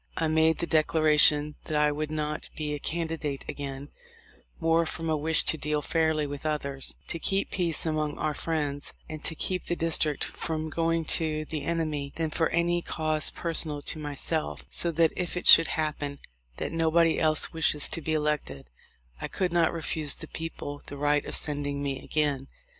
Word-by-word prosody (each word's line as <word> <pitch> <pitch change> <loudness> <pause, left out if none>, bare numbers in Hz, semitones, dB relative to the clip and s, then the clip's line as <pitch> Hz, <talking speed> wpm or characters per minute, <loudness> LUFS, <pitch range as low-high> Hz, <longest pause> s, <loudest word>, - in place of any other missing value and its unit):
I 160 - +1
made 160 +1 +3
the 170 - -1
declaration 150 -2 +4
that 155 - -2
I 150 0 +3
would 150 +1 -3
not 150 0 -3
be 150 -1 -3
a 145 - -4
candi 165 +1 -3
date 140 -3 -4
again, 140 0 -6 0.7
more 165 +1 +3
from 165 0 -3
a - - +2
wish 155 +2 +4
to 160 - +1
deal 150 0 -1
fairly 160 -2 +1
with 145 -1 -6
others, 140 -3 -1
to 165 - -4
keep 195 +4 +1
peace 170 -4 +1
among 155 -2 -1
our 155 -1 -1
friends, 145 -3 -3
and 155 -1 -8
to 160 - 0
keep 180 +3 -1
the 175 - -1
district 160 -3 +1
from 155 -1 -4
going 165 0 0 0.2
to 155 -1 -2
the 155 -2 -5
enemy, 155 -4 -2
than 160 -2 -2
for 160 +1 +1
any 175 +1 +1
cause 155 -2 0
personal 155 -3 +1
to 155 - -4
myself, 150 +2 -1
so 170 - +4
that 165 -1 +2
if 180 0 -3
it 180 - -4
should 165 - +9
happen 150 -2 -3 0.4
that - - -3
nobody 165 0 +2
else 155 -1 +2
wishes 155 -2 +1
to 165 - -1
be 160 +1 -1
elected 150 - -2 0.5
I - - -3
could 180 -3 -2
not 170 -2 +3
refuse 155 -2 0
the - - -9
people 155 -3 -6
the 145 - -7
right 145 0 +1
of - - +2
sending 145 -1 -1
me 140 -1 -3
again. 145 -3 0
155 Hz, 185 wpm, -27 LUFS, 150-165 Hz, 0.7 s, should